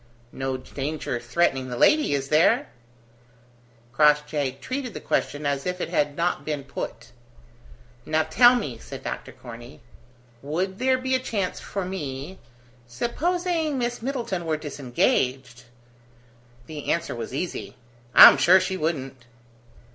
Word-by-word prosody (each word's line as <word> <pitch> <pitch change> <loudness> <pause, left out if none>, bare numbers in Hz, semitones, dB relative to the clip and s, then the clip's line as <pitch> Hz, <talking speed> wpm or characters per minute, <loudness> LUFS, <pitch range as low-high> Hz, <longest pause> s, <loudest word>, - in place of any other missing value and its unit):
"No 135 0 -3
danger 135 -1 -4
threatening 130 0 0
the 120 - -5
lady, 300 - +4
is 135 0 -3
there?" 155 +2 +3 1.2
Crossjay 150 -1 +2
treated 255 -4 -5
the - - -4
question 145 +1 -2
as 140 +2 -1
if 180 0 -3
it - - -3
had 145 -1 0
not 170 +1 0
been 150 -2 -3
put. 115 -3 -7 0.9
"Now, 155 0 +1
tell 240 +11 +6
me," 135 - -3
said - - -9
Dr. - - -5
Corney, 120 +1 -12 0.6
"would 180 +7 -3
there 260 +1 +2
be 260 0 -2
a 260 - +3
chance 205 -7 -3
for 195 -2 -5
me, 155 -2 -6 0.5
supposing 320 - -1
Miss 240 -1 -2
Middleton 235 -9 -3
were 155 -1 0
disengaged?" 130 -3 -1 1.0
The 150 0 -7
answer 170 0 -1
was 115 -1 -6
easy. 145 -1 -5 0.4
"I'm - - +11
sure 175 +8 +6
she 185 0 -2
wouldn't." 135 -7 -3
155 Hz, 130 wpm, -24 LUFS, 135-195 Hz, 1.2 s, I'm